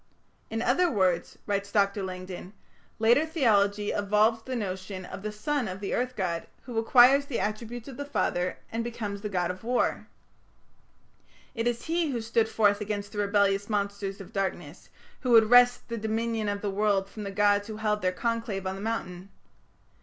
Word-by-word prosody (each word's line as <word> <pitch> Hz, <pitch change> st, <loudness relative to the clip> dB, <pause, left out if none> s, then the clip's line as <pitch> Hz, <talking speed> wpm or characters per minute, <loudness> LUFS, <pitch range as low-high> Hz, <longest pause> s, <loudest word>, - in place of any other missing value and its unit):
"In 225 Hz, +1 st, -2 dB
other 340 Hz, +9 st, +3 dB
words," 185 Hz, -, 0 dB
writes 200 Hz, -1 st, -2 dB
Dr. 200 Hz, -1 st, +2 dB
Langdon, 185 Hz, 0 st, -7 dB, 0.4 s
"later 235 Hz, +6 st, +4 dB
theology 210 Hz, -10 st, +2 dB
evolved 210 Hz, +3 st, +2 dB
the 260 Hz, -, -2 dB
notion 190 Hz, -3 st, -4 dB
of 185 Hz, -, -8 dB
the 215 Hz, +1 st, -4 dB
son 250 Hz, +4 st, -2 dB
of 185 Hz, 0 st, -5 dB
the 200 Hz, -, -3 dB
earth 250 Hz, +1 st, -1 dB
god, 170 Hz, -4 st, -2 dB, 0.2 s
who 240 Hz, -3 st, -3 dB
acquires 255 Hz, +4 st, +6 dB
the 260 Hz, -, -2 dB
attributes 225 Hz, +2 st, -4 dB
of 270 Hz, -, -9 dB
the 285 Hz, -, -3 dB
father, 180 Hz, -10 st, -1 dB
and 230 Hz, +1 st, -2 dB
becomes 215 Hz, -4 st, -5 dB
the 210 Hz, -, -4 dB
god 180 Hz, -2 st, 0 dB
of 185 Hz, +3 st, -10 dB
war. 245 Hz, +2 st, 0 dB, 1.5 s
It 230 Hz, -1 st, -1 dB
is 240 Hz, -1 st, -1 dB
he 330 Hz, -1 st, 0 dB
who 250 Hz, -4 st, -2 dB
stood 225 Hz, 0 st, +1 dB
forth 205 Hz, -2 st, +2 dB
against 205 Hz, -1 st, -4 dB
the 210 Hz, -, -5 dB
rebellious 200 Hz, 0 st, +2 dB
monsters 200 Hz, -1 st, -2 dB
of 195 Hz, -, -11 dB
darkness, 195 Hz, -1 st, -4 dB, 0.3 s
who 255 Hz, -, -3 dB
would 225 Hz, 0 st, +6 dB
wrest 245 Hz, 0 st, +6 dB
the 230 Hz, -1 st, -4 dB
dominion 220 Hz, 0 st, -1 dB
of 200 Hz, 0 st, -3 dB
the 205 Hz, -, -2 dB
world 200 Hz, -1 st, +1 dB
from 215 Hz, -, -9 dB
the 200 Hz, -, -4 dB
gods 205 Hz, 0 st, +2 dB
who 215 Hz, -1 st, -6 dB
held 210 Hz, -1 st, 0 dB
their 185 Hz, -, +1 dB
conclave 225 Hz, -1 st, -2 dB
on 190 Hz, -, -1 dB
the 195 Hz, -, -7 dB
mountain. 195 Hz, -4 st, -4 dB
210 Hz, 185 wpm, -28 LUFS, 195-230 Hz, 1.5 s, acquires